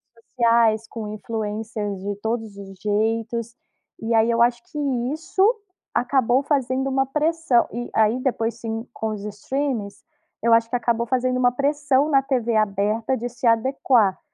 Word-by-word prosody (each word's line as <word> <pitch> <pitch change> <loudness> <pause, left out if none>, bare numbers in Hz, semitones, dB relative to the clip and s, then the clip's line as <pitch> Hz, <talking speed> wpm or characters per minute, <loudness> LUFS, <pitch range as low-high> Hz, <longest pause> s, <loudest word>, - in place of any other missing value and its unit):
redes 230 - -26
sociais, 230 -2 +3
com 220 -2 -6
influencers 215 -1 -4
de 205 +1 -3
todos 220 -1 -3
os 195 -1 -10
jeitos. 225 +3 -1 0.4
E 225 +1 -2
aí 225 +1 +4
eu 235 0 +2
acho 240 0 +3
que 300 - -11 0.3
isso 340 +5 -1 0.5
acabou 250 +1 +2
fazendo 265 -2 0
uma 270 0 +1
pressão. 300 -2 +1
E 240 +1 -5
aí, 220 +3 +3
depois, 230 -3 -1
sim, 225 +1 -5
com 220 - -3
os 210 -2 -5
streamings, 210 0 -3 0.4
eu 230 0 +4
acho 230 0 +4
que - - -2
acabou 235 -1 0
fazendo 255 0 +1
uma 245 -1 +3
pressão 285 +1 +1
na 275 -2 +4
TV 245 -4 -1
aberta 215 +4 +1
de 240 - -4
se 245 +1 -3
adequar. 230 -3 +2
235 Hz, 160 wpm, -23 LUFS, 220-260 Hz, 0.5 s, aí